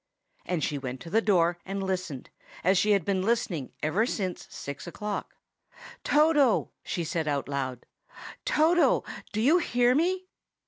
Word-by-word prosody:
And 175 -4 -1
she 145 0 -1
went 130 -1 -5
to 165 - -9
the 220 +3 +4
door 175 -5 +2
and 195 0 -4
listened, 185 -8 -4 0.3
as 185 +1 +4
she 210 0 +3
had 195 -5 +1
been 195 -2 +1
listening 190 - -1
ever 185 +10 +2
since 190 -7 -3
six 140 +4 -7
o'clock. 210 +4 -5 0.7
"Toto!" 295 -5 +3
she 175 - -3
said 160 -1 -2
aloud. 140 -3 -2 0.6
"Toto, 330 +3 +3 0.3
do 215 - -2
you 295 +11 +5
hear 245 -6 +2
me?" 365 +6 +1
190 Hz, 145 wpm, -28 LUFS, 160-240 Hz, 0.7 s, you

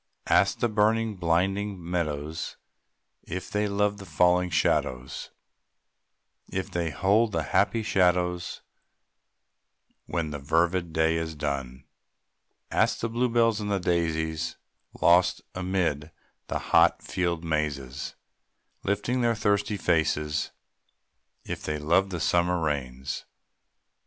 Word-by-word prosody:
Ask - - +3
the 120 - +4
burning, 110 0 +1
blinded 95 +4 0
meadows 80 -3 -3 0.6
If 90 +1 -6
they 105 0 +1
love 100 0 +1
the 100 - -10
falling 90 0 +3
shadows, 65 -6 0 1.2
If 95 0 -3
they 85 -2 -1
hold 105 +7 +2
the 80 - 0
happy 110 - +1
shadows 90 -3 +1 1.4
When 85 -3 -2
the 75 - -4
fervid 85 +4 +1
day 80 +1 +2
is 80 -1 -3
done. 70 -3 -3 0.9
Ask - - +2
the 115 - -1
blue 120 +2 +1
bells 115 -2 +3
and 105 - -3
the 100 - +2
daisies, 80 -2 -1 0.4
Lost 90 +1 +4
amid 90 -5 -1 0.4
the - - -1 0.2
hot 85 +1 +5
field 85 -2 -1
mazes, 75 -5 -2 0.7
Lifting 105 +5 0
up - - +1
their 115 -1 +2
thirsty 105 -1 +1
faces, 80 -4 +1 0.9
If - - -5
they 75 - -2
love 85 +6 +2
the 90 -3 -4
summer 90 +2 +2
rains. 65 -5 -3
85 Hz, 115 wpm, -27 LUFS, 80-100 Hz, 1.4 s, hot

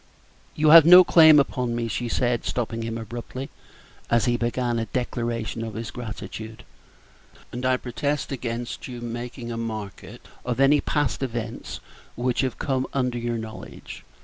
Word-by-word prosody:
"You 155 0 +3
have 165 -1 +11
no 180 +3 +9
claim 160 -3 +7
upon 125 -4 -1
me," 120 -1 -2
she 120 +2 -3
said, 120 0 0
stopping 115 -1 -3
him 115 0 -4
abruptly, 120 +5 -7 0.6
as 120 -2 +3
he 120 - +2
began 120 0 -1
a 115 - -2
declaration 115 -2 -3
of 110 -2 -6
his 115 0 -5
gratitude, 110 -1 -8 0.9
"and 125 - -6
I 130 0 +3
protest 140 +4 -3
against 120 -1 -4
your 120 -2 -8
making 120 0 -6
a 115 - -4
market 110 -3 -7 0.2
of 125 0 -3
any 140 +1 +5
past 145 -7 -1
events 120 -3 -5 0.3
which 125 0 0
have 130 -2 -2
come 130 -1 -1
under 125 -3 -1
your 120 0 -2
knowledge. 110 -1 -9
120 Hz, 155 wpm, -24 LUFS, 115-130 Hz, 0.9 s, have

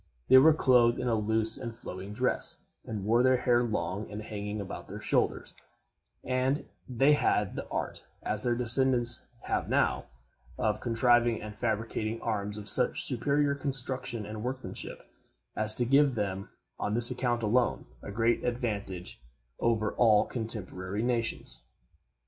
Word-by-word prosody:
They 130 - +9
were 155 +3 +5
clothed 125 -5 +3
in 125 - -3
a 120 - +1
loose 110 +1 0
and 120 -3 -7
flowing 95 -4 -8
dress, 125 +4 +1 0.3
and 105 -4 -6
wore 115 +3 +3
their 130 0 +3
hair 120 -1 +2
long 105 -3 -3
and 105 +1 -7
hanging 105 0 -6
about 100 - -8
their - - -8
shoulders; - - -1 0.7
and 130 +3 -1 0.2
they 135 +4 +3
had 105 -8 0
the - - -6
art, - - -4 0.2
as 105 0 -3
their 120 0 0
descendants 120 0 +3 0.2
have - - -2
now, - - 0 0.5
of 105 0 -1
contriving 120 0 +2
and 105 0 -9
fabricating 110 0 -3
arms 105 -2 -3
of 105 -1 -9
such - - +4
superior 145 0 +1
construction 130 -4 -3
and 105 +1 -7
workmanship, 130 +1 -4 0.5
as 110 0 +7
to 120 - +3
give 140 +1 +3
them, 100 -2 -4 0.3
on 105 - -2
this 120 +1 +9
account 120 -2 -2
alone, 120 +3 0 0.2
a - - -8
great 115 +3 0
advantage 105 - -4 0.4
over 110 -2 0
all 110 -3 +3
cotemporary 105 -3 -3
nations. 115 - -3
115 Hz, 150 wpm, -28 LUFS, 105-125 Hz, 0.7 s, They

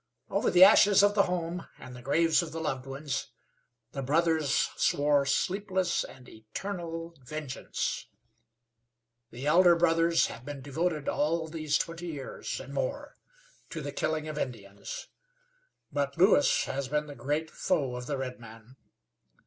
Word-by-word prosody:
Over - - +1
the 180 +1 +7
ashes 200 0 +7
of 205 0 +5
the 205 - +4
home 175 -1 -3
and 125 - -10
the 125 - -10
graves 165 +7 +3
of 165 -2 -6
the 165 - -5
loved 135 -4 -3
ones 135 0 -4 0.6
the 135 - -4
brothers 155 +1 +2
swore 145 -1 +2
sleepless 185 +4 0
and 125 -1 -12
eternal 165 - -6
vengeance. 150 0 -4 1.2
The 125 +4 -8
elder 175 +3 +6
brothers 165 0 +3
have 115 - -7
been 140 -1 -7
devoted 155 +2 -2
all 160 +2 0
these 155 -2 0
twenty 165 +1 -4
years 145 -5 -5
and - - -9
more - - -3 0.5
to 165 - -5
the 145 -1 -5
killing 155 +1 -2
of 155 -1 -4
Indians; 100 -6 -6 0.8
but 140 0 -2
Lewis 180 -4 +5
has 135 0 -3
been 150 +2 0
the 145 - -9
great 150 +3 -2
foe 140 -9 -1
of 125 0 -6
the 145 - -2
redman. 120 -1 -8
150 Hz, 145 wpm, -29 LUFS, 135-170 Hz, 1.2 s, the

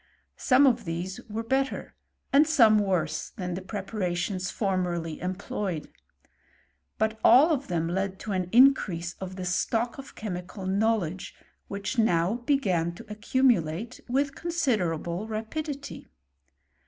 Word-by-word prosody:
Some 265 +2 +5
of 240 -4 +2
these 175 +3 -4
wen| 260 +5 -1 0.4
and 290 +2 +6
some 230 -9 +5
worse, 175 -6 -1
than 180 -2 -4
the 185 - -4
preparations 185 -2 -3
fomMj 180 -5 -1 0.2
ployed; 190 -5 -4 1.1
but 220 0 0
all 275 +8 +7
of 280 -2 -2
them 165 -2 -1
led 190 +2 -2
to 215 - -5
an 185 -2 -1
increaie 185 -6 +2
stock 225 +7 -1
of 270 - -10
chemical 185 -1 -6
knowledge, 195 -3 0 0.3
which 200 +5 -3
now 180 -1 +2
tn 180 - +1
accumulate 215 -3 +1
with 275 +2 +1
considerable 210 - -1
rapidity. 280 +7 -5
200 Hz, 110 wpm, -27 LUFS, 180-240 Hz, 1.1 s, all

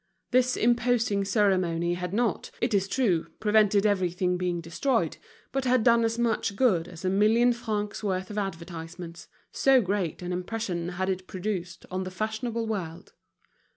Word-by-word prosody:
This 255 0 +3
imposing 235 -4 +2
ceremony 185 -4 +1
had 180 0 -4
not, 230 +2 0
it 235 -1 0
is 195 -1 +2
true, 195 -9 +1
prevented 210 -1 +3
everything 180 -3 +1
being 180 -1 -1
destroyed, 170 - -1 0.3
but 270 0 -1
had 250 -2 +3
done 235 0 +5
as 225 0 0
much 230 -4 0
good 195 -8 +2
as 175 +1 -9
a - - +2
million 225 +5 +4
francs' 215 -3 -3
worth 190 -1 -2
of 210 - -6
advertisements, 170 -2 -6 0.2
so 270 -1 +4
great 190 -5 -2
an 180 0 -3
impression 180 -2 -3
had 185 +1 -2
it 185 0 -5
produced 185 -3 -4
on 185 +1 -2
the 185 - -5
fashionable 220 +4 -3
world. 180 -5 -5
200 Hz, 155 wpm, -27 LUFS, 180-225 Hz, 0.3 s, done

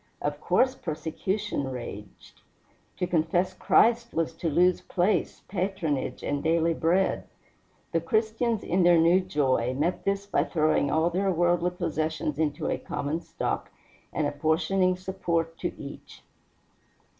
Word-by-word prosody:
Of 145 0 -3
course 255 +11 +3
persecution 160 - -3
raged. 105 -5 -9 0.6
To - - 0
confess 175 +2 +1
Christ 235 +4 +3
was 165 0 0
to 165 +1 -2
lose 180 +4 +3
place, 185 +4 0
patronage, 180 -7 -2
and 145 0 -1
daily 165 +1 +2
bread. 175 +4 +1 0.7
The 165 - +1
Christians, 220 +5 0
in 185 +2 +1
their 175 -1 +6
new 170 +3 +5
joy, 130 -8 0
met 160 +6 -1
this 200 0 -1
by 200 - +1
throwing 155 -3 +1
all 160 +2 +2
their 195 +3 +1
worldly 175 0 +2
possessions 155 -3 -2
into 150 -2 -1
a - - -1
common 150 +4 -3
stock - - -3 0.4
and 155 - -1
apportioning 165 +6 +1
support 170 -3 -2
to 175 - -2
each. 140 - -10
170 Hz, 135 wpm, -27 LUFS, 155-185 Hz, 0.7 s, their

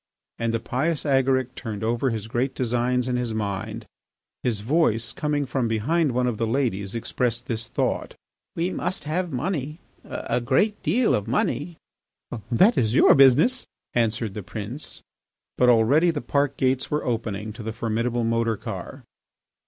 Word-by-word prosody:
And 115 -1 0
the 115 - 0
pious 150 +8 -1
Agaric 130 -2 +2
turned 110 -5 -6
over 120 +4 +1
his 110 -2 -4
great 125 +4 -1
designs 125 0 0
in 125 -1 0
his 120 -3 -2
mind. 110 +1 -3 0.6
His 115 -5 -1
voice, 115 -3 +1
coming 150 -1 -1
from 125 -1 -1
behind 140 +8 +1
one 125 +1 +1
of 120 -3 -1
the 115 - +1
ladies, 110 -5 -1
expressed 120 0 -1
this 115 -1 -3
thought: - - -1 0.4
"We 170 +3 0
must 180 -1 -2
have 165 +4 -2
money, 150 +1 -2 0.3
a 125 - -3
great 145 - +1
deal 245 -1 +2
of 105 - 0
money." 150 +7 -1 0.7
"That 190 - +5
is 115 0 +1
your - - +7
business," 140 - +5 0.3
answered 115 -2 0
the 105 - -5
prince. 110 - -7 0.5
But 125 - +4
already 125 +9 +5
the 160 -3 -1
park 140 +2 0
gates 130 0 +1
were 150 - -1
opening 110 -3 -3
to 115 - -9
the 110 +1 -4
formidable 115 +1 -1
motor 115 -1 +1
car. - - -7
125 Hz, 160 wpm, -24 LUFS, 115-140 Hz, 0.7 s, your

